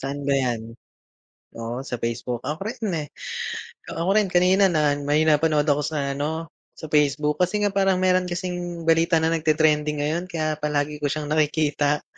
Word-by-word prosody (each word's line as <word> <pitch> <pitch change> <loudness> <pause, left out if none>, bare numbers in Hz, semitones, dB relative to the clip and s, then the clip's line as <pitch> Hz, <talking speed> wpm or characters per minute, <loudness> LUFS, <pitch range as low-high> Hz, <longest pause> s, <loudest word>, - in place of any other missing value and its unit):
Saan 140 +1 -4
ba 140 - +3
yan? 125 -4 0 0.9
O 115 +3 -5
sa 120 -4 -5
Facebook, 120 +1 -3
ako 155 +4 -4
rin 220 0 -4 0.2
eh, - - -13 0.8
ako 170 +3 -2
rin 210 -1 +3
kanina 185 +2 +4
na 150 -4 +2
may 145 +2 +2
napanood 155 -1 +3
ako 145 -1 +2
sa 145 -2 -2
ano, 160 +4 -3 0.2
sa - - -10
Facebook 150 +1 +2
kasi 205 +4 +1
nga 205 - +1
parang 195 -1 +2
meron 185 0 +2
kasing 175 -1 -4
balita 165 +1 +3
na 160 +1 +2
nagte-trending 155 -1 +2
ngayon 160 +4 -1
kaya 155 -3 -2
palagi 150 0 -1
ko 145 - 0
siyang 150 +1 -3
nakikita. 150 -1 +1
155 Hz, 170 wpm, -24 LUFS, 145-175 Hz, 0.9 s, kanina